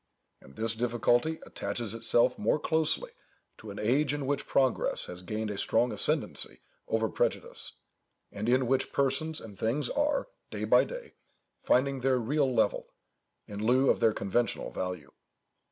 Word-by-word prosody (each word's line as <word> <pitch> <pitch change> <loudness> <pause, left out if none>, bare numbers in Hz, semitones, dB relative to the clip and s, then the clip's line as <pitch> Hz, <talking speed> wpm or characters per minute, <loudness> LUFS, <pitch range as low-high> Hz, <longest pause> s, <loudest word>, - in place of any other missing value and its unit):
And 70 - -16
this 115 0 -1
difficulty 120 +6 +1
attaches 105 +2 -3
itself 120 +2 +2
more 110 - +2
closely 160 - 0 0.5
to 110 - -10
an 100 - -8
age 140 +6 +2
in 145 -2 -3
which 140 +1 -1
progress 130 -2 +1
has 90 0 -8
gained 110 +3 -3
a 100 - -4
strong 120 +1 +2
ascendency - - -1 0.3
over 110 0 +1
prejudice, - - -2 0.6
and 105 +3 -3
in 130 +1 +3
which 130 +2 +1
persons 140 +4 0
and 105 -4 -11
things 125 +7 0
are, 290 - +1 0.2
day - - -5
by - - +5
day, - - -8 0.5
finding 135 +1 +2
their 130 0 +2
real 135 +3 +1
level, 110 -4 +1 0.6
in 105 0 -6
lieu 130 +4 +4
of - - -1
their 115 -1 +4
conventional 105 +4 -1
value. 90 -6 -5
120 Hz, 155 wpm, -30 LUFS, 110-140 Hz, 0.6 s, by